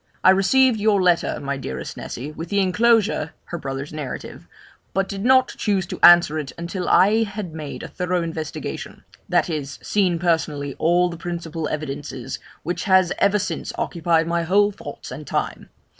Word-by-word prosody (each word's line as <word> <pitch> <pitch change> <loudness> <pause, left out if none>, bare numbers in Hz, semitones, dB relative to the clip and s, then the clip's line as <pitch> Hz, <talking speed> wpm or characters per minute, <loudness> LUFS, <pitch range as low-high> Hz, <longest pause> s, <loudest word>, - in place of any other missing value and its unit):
'I 185 - +8
received 225 +5 +4
your 205 -1 +3
letter, 180 -2 +2
my 140 0 -3
dearest 65 - -6
Nessy, 135 +6 -6
with 160 +2 -7
the 205 - -1
enclosure 205 -3 +2
[her 170 - -6
brother's 135 +1 -5
narrative], 150 -4 -7 0.5
but 195 0 +1
did 195 0 -5
not 260 +1 +5
choose 195 -4 +1
to - - -7
answer 175 -3 +7
it 140 -3 -5
until 175 +2 -4
I 210 +4 +5
had 205 -5 -4
made 155 -3 -7
a - - -5
thorough 180 -1 -1
investigation; 160 -2 -6 0.3
that - - +2
is, 145 -4 -4
seen 185 -4 +1
personally 155 -5 0
all 175 +2 +3
the 170 - -7
principal 165 -2 -4
evidences, 135 -4 -5 0.2
which 175 +4 -3
has 190 -3 +4
ever 200 +1 +4
since 205 - -3
occupied 165 -1 +1
my 170 +1 0
whole 200 +5 +3
thoughts 200 - -9
and - - -8
time. - - -3
175 Hz, 170 wpm, -22 LUFS, 155-195 Hz, 0.5 s, I